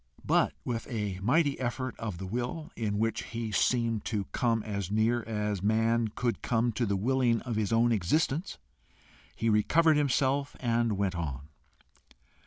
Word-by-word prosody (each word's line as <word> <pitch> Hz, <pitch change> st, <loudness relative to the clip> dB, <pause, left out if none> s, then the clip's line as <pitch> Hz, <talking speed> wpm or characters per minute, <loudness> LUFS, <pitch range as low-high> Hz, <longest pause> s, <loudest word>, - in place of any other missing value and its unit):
But -, -, +3 dB
with 115 Hz, -2 st, -3 dB
a 105 Hz, -5 st, -3 dB
mighty 140 Hz, -, +2 dB
effort 130 Hz, 0 st, -2 dB
of 105 Hz, -6 st, -4 dB
the 95 Hz, -, -6 dB
will, 125 Hz, -, -4 dB
in 105 Hz, -3 st, -2 dB
which 115 Hz, +1 st, 0 dB
he 115 Hz, -1 st, -5 dB
seemed 115 Hz, 0 st, +1 dB
to 105 Hz, -3 st, -1 dB
come 115 Hz, -3 st, +1 dB
as 100 Hz, -4 st, -3 dB
near 110 Hz, +3 st, +2 dB
as 105 Hz, -3 st, -2 dB
man 115 Hz, +2 st, +2 dB
could 115 Hz, 0 st, -2 dB
come 120 Hz, 0 st, +1 dB
to 115 Hz, +1 st, -1 dB
the 100 Hz, -, +1 dB
willing 120 Hz, +2 st, +2 dB
of 120 Hz, -3 st, -4 dB
his 105 Hz, -1 st, -1 dB
own 115 Hz, +1 st, +3 dB
existence, 145 Hz, -, 0 dB, 0.8 s
he 115 Hz, -, -2 dB
recovered 150 Hz, +9 st, +4 dB
himself 140 Hz, 0 st, +1 dB
and 115 Hz, -2 st, +1 dB
went 100 Hz, -2 st, 0 dB
on. 75 Hz, -4 st, -5 dB
115 Hz, 160 wpm, -29 LUFS, 105-125 Hz, 0.8 s, recovered